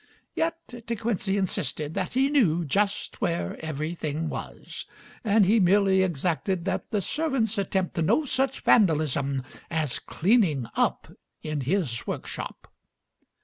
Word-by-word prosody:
Yet 330 0 0 0.3
De 235 - -1
Quincey 205 -3 0
insisted 160 -6 -1
that 185 0 -2
he 270 +2 +2
knew 175 - +3
"just 200 - -1
where 170 -5 -2
everything 155 0 -3
was," - - -7 0.4
and 215 -2 +4
he 220 +4 +4
merely 190 0 +4
exacted 175 +1 -1
that 195 - -2
the 210 -3 0
servants 265 - 0
attempt 190 -2 -1
no 220 - +2
such 265 0 0
vandalism 145 - +3 0.3
as 155 -5 -1
"cleaning 175 - +2
up" - - 0 0.3
in 155 -2 -2
his 135 -5 -1
workshop. - - -6
190 Hz, 125 wpm, -26 LUFS, 155-220 Hz, 0.4 s, and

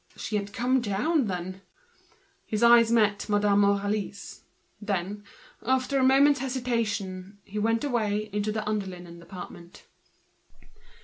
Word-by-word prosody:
She 215 - -4
had 200 -1 -2
come 250 +4 +1
down, 245 +8 +1
then? 185 0 -5 0.9
His 215 +1 -1
eyes 235 -1 +6
met 210 -3 +2
Madame 205 -1 +3
Aurélie's. 200 0 -1 0.4
Then, 205 0 -3 0.4
after 260 +2 +1
a - - +2
moment's 275 +2 +5
hesitation, 215 -7 -3
he 210 +1 -5
went 225 +3 +1
away 215 -6 -1
into 210 +1 -1
the 215 0 -3
under 210 -2 -1
linen 175 -2 -10
department. 175 0 -11
210 Hz, 125 wpm, -27 LUFS, 200-235 Hz, 0.9 s, eyes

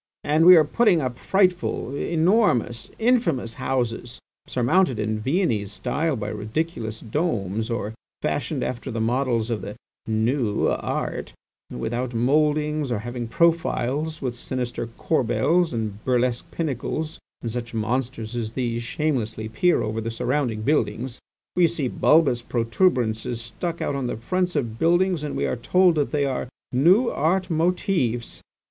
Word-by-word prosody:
And 155 +3 +3
we 180 - +11
are 160 - +7
putting 185 +3 +3
up 125 -4 -3
frightful, 180 - +1
enormous, 160 - +1
infamous 220 - +1
houses, 120 -2 -2 0.3
surmounted 130 +2 +2
in 110 0 -1
Viennese 115 - 0
style 145 +7 -1
by 105 -3 -4
ridiculous 110 +1 -3
domes, 110 - -1
or 110 -2 -2 0.3
fashioned - - -2
after 125 +2 -4
the 115 -2 -3
models 120 0 0
of 115 - -1
the - - -7 0.3
'new 110 0 +1
art' - - -3 0.4
without 120 +2 -3
mouldings, 150 +3 +1
or 120 - +1
having 120 +2 -5
profiles 155 0 +1
with 125 -2 -1
sinister 120 -1 -4
corbels 160 +7 +1
and 110 -3 -4
burlesque 125 -1 0
pinnacles, 155 +1 -3 0.2
and 115 - -2
such 120 0 -5
monsters 115 0 -2
as 115 -2 -3
these 120 -2 -1
shamelessly 120 -5 -2
peer 175 +11 +2
over 110 +1 -2
the 115 - -3
surrounding 115 -1 -1
buildings. 125 -3 0 0.4
We 175 -1 +5
see 155 -5 -2
bulbous 140 -2 +3
protuberances 120 - 0
stuck 165 +9 -4
on 140 -3 -1
the - - -3
fronts 180 +10 -1
of 115 -6 -2
buildings 175 0 +2
and 150 - -3
we 70 - 0
are 65 -1 -1
told 180 -1 +4
they 145 -1 +1
are 130 -2 -2 0.2
'new 180 - +5
art' 180 +4 0
motives. 160 - 0
125 Hz, 140 wpm, -24 LUFS, 115-160 Hz, 0.4 s, we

